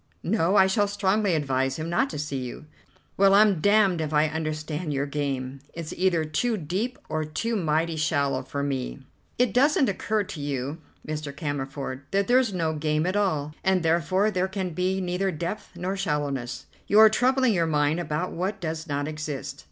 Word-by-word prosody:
"No, 185 Hz, -1 st, +1 dB
I 190 Hz, -, +7 dB
shall 205 Hz, +2 st, +2 dB
strongly 200 Hz, -1 st, +1 dB
advise 135 Hz, -3 st, 0 dB
him 160 Hz, +1 st, -4 dB
not 175 Hz, +11 st, +1 dB
to -, -, -5 dB
see 145 Hz, -2 st, -3 dB
you." 125 Hz, +3 st, -7 dB, 0.5 s
"Well, 195 Hz, 0 st, +6 dB
I'm 205 Hz, -5 st, +5 dB
damned 200 Hz, -4 st, +4 dB
if 155 Hz, -1 st, -3 dB
I 150 Hz, +1 st, +4 dB
understand 155 Hz, +1 st, -3 dB
your 140 Hz, 0 st, 0 dB
game. 140 Hz, -2 st, -3 dB, 0.2 s
It's 165 Hz, -2 st, -5 dB
either 175 Hz, -3 st, +2 dB
too 215 Hz, +10 st, 0 dB
deep 195 Hz, +10 st, -3 dB
or 155 Hz, 0 st, -1 dB
too 155 Hz, +10 st, -2 dB
mighty 165 Hz, -3 st, 0 dB
shallow 140 Hz, -3 st, +1 dB
for 140 Hz, +2 st, -4 dB
me." 135 Hz, -1 st, -3 dB, 0.3 s
"It 245 Hz, -5 st, +2 dB
doesn't 275 Hz, -1 st, +4 dB
occur 210 Hz, +2 st, 0 dB
to 165 Hz, -6 st, -7 dB
you, 140 Hz, +2 st, -3 dB, 0.3 s
Mr. 150 Hz, -1 st, -4 dB
Cammerford, 140 Hz, -2 st, -4 dB
that 200 Hz, 0 st, +1 dB
there's 250 Hz, -2 st, +4 dB
no 165 Hz, -4 st, -1 dB
game 155 Hz, 0 st, 0 dB
at 185 Hz, +2 st, 0 dB
all, 155 Hz, -8 st, 0 dB
and 190 Hz, -2 st, +2 dB
therefore 175 Hz, +6 st, +2 dB
there 185 Hz, -1 st, 0 dB
can 190 Hz, -2 st, -3 dB
be 185 Hz, +3 st, 0 dB
neither 180 Hz, +2 st, -1 dB
depth 175 Hz, +4 st, -4 dB
nor 180 Hz, +2 st, -3 dB
shallowness. 140 Hz, -8 st, -2 dB, 0.2 s
You 205 Hz, -, +3 dB
are 220 Hz, 0 st, +10 dB
troubling 255 Hz, +2 st, +3 dB
your 170 Hz, -3 st, +1 dB
mind 150 Hz, +1 st, +1 dB
about 170 Hz, +1 st, -2 dB
what 195 Hz, +4 st, -3 dB
does 160 Hz, -2 st, -4 dB
not 145 Hz, -1 st, -2 dB
exist." 145 Hz, -3 st, -5 dB
165 Hz, 185 wpm, -26 LUFS, 145-195 Hz, 0.5 s, are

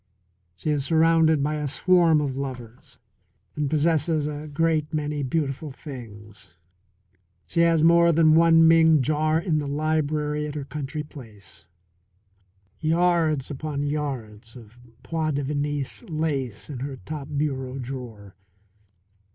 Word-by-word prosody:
She 155 Hz, -, -3 dB
is 145 Hz, -2 st, 0 dB
surrounded 160 Hz, -1 st, +3 dB
by 150 Hz, +1 st, -1 dB
a 150 Hz, -1 st, -2 dB
swarm 165 Hz, +1 st, +3 dB
of 140 Hz, -3 st, -2 dB
lovers 125 Hz, -3 st, -8 dB, 0.6 s
and 150 Hz, -2 st, -1 dB
possesses 155 Hz, 0 st, +1 dB
a 150 Hz, 0 st, -5 dB
great 155 Hz, 0 st, 0 dB
many 150 Hz, -2 st, -2 dB
beautiful 140 Hz, +1 st, -2 dB
things. 105 Hz, -, -11 dB, 0.9 s
She 170 Hz, -, -3 dB
has 165 Hz, -2 st, +4 dB
more 170 Hz, +1 st, +5 dB
than 160 Hz, -1 st, +4 dB
one 165 Hz, 0 st, +6 dB
Ming 160 Hz, -3 st, +5 dB
jar 155 Hz, +2 st, +1 dB
in 165 Hz, -3 st, 0 dB
the 145 Hz, -, -4 dB
library 150 Hz, 0 st, -1 dB
at 150 Hz, -, -7 dB
her 145 Hz, -2 st, -4 dB
country 150 Hz, +2 st, -5 dB
place; 110 Hz, -, -13 dB, 1.1 s
yards 160 Hz, -3 st, +1 dB
upon 145 Hz, 0 st, -4 dB
yards 130 Hz, -7 st, -4 dB
of 120 Hz, -1 st, -14 dB, 0.2 s
point 155 Hz, -3 st, -2 dB
de 145 Hz, -, -1 dB
Venise 145 Hz, 0 st, -3 dB
in 140 Hz, -5 st, -3 dB
her 135 Hz, +1 st, -5 dB
top 150 Hz, -3 st, -6 dB
bureau 135 Hz, -3 st, -2 dB
drawer. 120 Hz, -6 st, -8 dB
150 Hz, 125 wpm, -24 LUFS, 135-160 Hz, 1.1 s, one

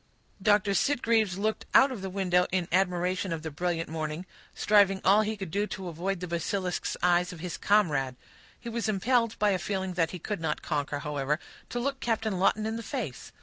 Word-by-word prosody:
Doctor 205 Hz, 0 st, +3 dB
Sitgreaves 225 Hz, -4 st, +2 dB
looked 215 Hz, +2 st, -1 dB
out 270 Hz, +1 st, +7 dB
of 235 Hz, -7 st, -5 dB
the 190 Hz, -, -4 dB
window 180 Hz, -2 st, +2 dB
in 180 Hz, -2 st, 0 dB
admiration 185 Hz, +1 st, +1 dB
of 165 Hz, -1 st, -3 dB
the 160 Hz, -, -4 dB
brilliant 170 Hz, +1 st, -2 dB
morning, 155 Hz, +2 st, -4 dB, 0.3 s
striving 200 Hz, -2 st, +4 dB
all 200 Hz, +3 st, +6 dB
he 215 Hz, 0 st, -2 dB
could 190 Hz, -5 st, -6 dB
to 200 Hz, -2 st, -2 dB
avoid 175 Hz, +3 st, -3 dB
the 180 Hz, -, -3 dB
basilisk's 180 Hz, +2 st, -2 dB
eyes 180 Hz, 0 st, +3 dB
of 175 Hz, -, -9 dB
his 180 Hz, +1 st, -4 dB
comrade. 150 Hz, -11 st, +2 dB, 0.4 s
He 235 Hz, -, -10 dB
was 230 Hz, -1 st, -2 dB
impelled, 230 Hz, +3 st, +1 dB
by 210 Hz, 0 st, +3 dB
a 185 Hz, -, +1 dB
feeling 190 Hz, -2 st, -2 dB
that 165 Hz, -2 st, +1 dB
he 180 Hz, -, -6 dB
could 200 Hz, +2 st, -4 dB
not 155 Hz, -2 st, -2 dB
conquer, 145 Hz, -2 st, -1 dB
however, 150 Hz, 0 st, -1 dB, 0.3 s
to 245 Hz, -, -3 dB
look 275 Hz, +2 st, -2 dB
Captain 220 Hz, -5 st, -1 dB
Lawton 210 Hz, +3 st, +2 dB
in 220 Hz, +1 st, -2 dB
the -, -, -4 dB
face. 230 Hz, -, -5 dB
190 Hz, 195 wpm, -28 LUFS, 170-215 Hz, 0.4 s, out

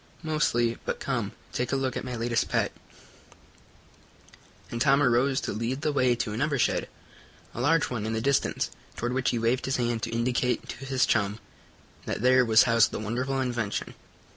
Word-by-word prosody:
"Mostly. 120 Hz, -7 st, +1 dB
But -, -, -3 dB
come, -, -, -2 dB, 0.2 s
take 125 Hz, -, -2 dB
a -, -, +1 dB
look 135 Hz, -1 st, -1 dB
at -, -, -3 dB
my 125 Hz, -1 st, -4 dB
latest 120 Hz, 0 st, 0 dB
pet," -, -, +1 dB, 2.0 s
and 115 Hz, -, -4 dB
Tom 140 Hz, +1 st, +4 dB
arose 130 Hz, +2 st, +3 dB
to -, -, -3 dB
lead 115 Hz, +6 st, -2 dB
the 155 Hz, -, +1 dB
way 130 Hz, -4 st, +3 dB
to 110 Hz, -2 st, -3 dB
another 140 Hz, +5 st, 0 dB
shed, -, -, +1 dB, 0.6 s
a 120 Hz, -, -4 dB
large 150 Hz, +2 st, +2 dB
one 110 Hz, -3 st, -2 dB
in 110 Hz, -, -2 dB
the 110 Hz, -, 0 dB
distance, 140 Hz, +4 st, 0 dB, 0.2 s
toward 120 Hz, +1 st, -2 dB
which 130 Hz, 0 st, +1 dB
he 120 Hz, -, 0 dB
waved 115 Hz, +3 st, +1 dB
his 135 Hz, -, 0 dB
hand 120 Hz, -2 st, -1 dB
to 115 Hz, -, -2 dB
indicate 125 Hz, +2 st, 0 dB
to 135 Hz, -, -7 dB
his 130 Hz, -1 st, +2 dB
chum 105 Hz, -1 st, +1 dB, 0.7 s
that -, -, -3 dB
there 130 Hz, 0 st, +6 dB
was 115 Hz, -2 st, +6 dB
housed 115 Hz, -3 st, +4 dB
the -, -, -5 dB
wonderful 125 Hz, +5 st, -2 dB
invention. 120 Hz, -5 st, -2 dB
125 Hz, 185 wpm, -27 LUFS, 115-135 Hz, 2.0 s, there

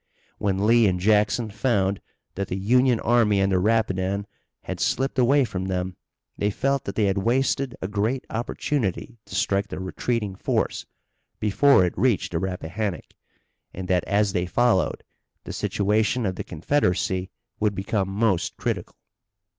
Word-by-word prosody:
When 100 Hz, 0 st, 0 dB
Lee 115 Hz, 0 st, +5 dB
and 90 Hz, -1 st, 0 dB
Jackson 105 Hz, +3 st, +2 dB
found 100 Hz, -4 st, 0 dB, 0.3 s
that 100 Hz, 0 st, -3 dB
the 90 Hz, -, -3 dB
Union 125 Hz, +4 st, +3 dB
army 110 Hz, -4 st, +3 dB
on 95 Hz, 0 st, +2 dB
the 95 Hz, -1 st, +2 dB
Rapidan 100 Hz, -2 st, +1 dB, 0.4 s
had -, -, -5 dB
slipped 135 Hz, 0 st, 0 dB
away 135 Hz, +2 st, +4 dB
from 95 Hz, -4 st, -4 dB
them 90 Hz, -1 st, -2 dB, 0.4 s
they 100 Hz, -, +2 dB
felt 135 Hz, +5 st, -1 dB
that 100 Hz, -, -5 dB
they 110 Hz, -, +1 dB
had 100 Hz, 0 st, +1 dB
wasted 130 Hz, +3 st, 0 dB
a -, -, -1 dB
great 110 Hz, +6 st, -1 dB
opportunity 115 Hz, -1 st, -2 dB
to -, -, -8 dB
strike 100 Hz, 0 st, +1 dB
the -, -, -6 dB
retreating 105 Hz, +2 st, -2 dB
force -, -, -1 dB, 0.5 s
before 105 Hz, +1 st, +4 dB
it 90 Hz, -, -3 dB
reached 115 Hz, -1 st, +1 dB
the 85 Hz, -, -1 dB
Rappahannock, 95 Hz, +1 st, -4 dB, 0.6 s
and 95 Hz, 0 st, -5 dB
that, 90 Hz, -1 st, +2 dB
as 100 Hz, -1 st, +1 dB
they 90 Hz, 0 st, 0 dB
followed, 120 Hz, -2 st, +1 dB, 0.4 s
the -, -, -7 dB
situation 105 Hz, +3 st, 0 dB
of 95 Hz, -, 0 dB
the -, -, -4 dB
Confederacy 95 Hz, -, 0 dB, 0.3 s
would 105 Hz, -1 st, +1 dB
become 95 Hz, +1 st, -1 dB
most 100 Hz, -3 st, 0 dB
critical. -, -, -3 dB
100 Hz, 155 wpm, -24 LUFS, 95-115 Hz, 0.6 s, Lee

